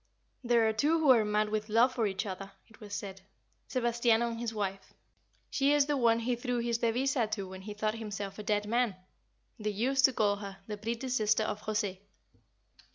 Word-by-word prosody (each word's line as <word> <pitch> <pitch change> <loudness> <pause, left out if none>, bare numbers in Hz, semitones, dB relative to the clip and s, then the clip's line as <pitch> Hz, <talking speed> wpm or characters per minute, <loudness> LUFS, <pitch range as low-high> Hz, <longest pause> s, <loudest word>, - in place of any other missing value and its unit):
"There 235 -2 +3
are 220 - +1
two 295 +9 +2
who 310 -4 +5
are 235 -4 +6
mad 210 0 +1
with 215 0 -2
love 235 +4 +4
for 230 -4 +1
each 195 +2 -3
other," 195 0 -6 0.2
it 225 - -19
was 210 -3 -11
said. 195 -1 -6 0.5
"Sebastiano 235 -2 +2
and 230 - -6
his 235 -1 -2
wife. 195 -3 -4 0.6
She 280 +1 +3
is 290 -1 +4
the 295 0 0
one 230 -3 +3
he 245 +1 0
threw 245 0 -2
his 235 -1 0
devisa 240 +1 +1
to 200 -3 -3
when 190 0 -9
he 205 +2 -7
thought 215 0 0
himself 205 -3 -6
a - - -5
dead 210 0 0
man. 235 -2 +1 0.6
They 215 0 -1
used 255 +6 +2
to 265 - +3
call 205 -3 +2
her 200 -1 -8
'the 210 0 -5
pretty 230 +4 -4
sister 215 -3 +2
of 210 - -3
Jose. 210 -3 -2
220 Hz, 205 wpm, -31 LUFS, 210-240 Hz, 0.6 s, are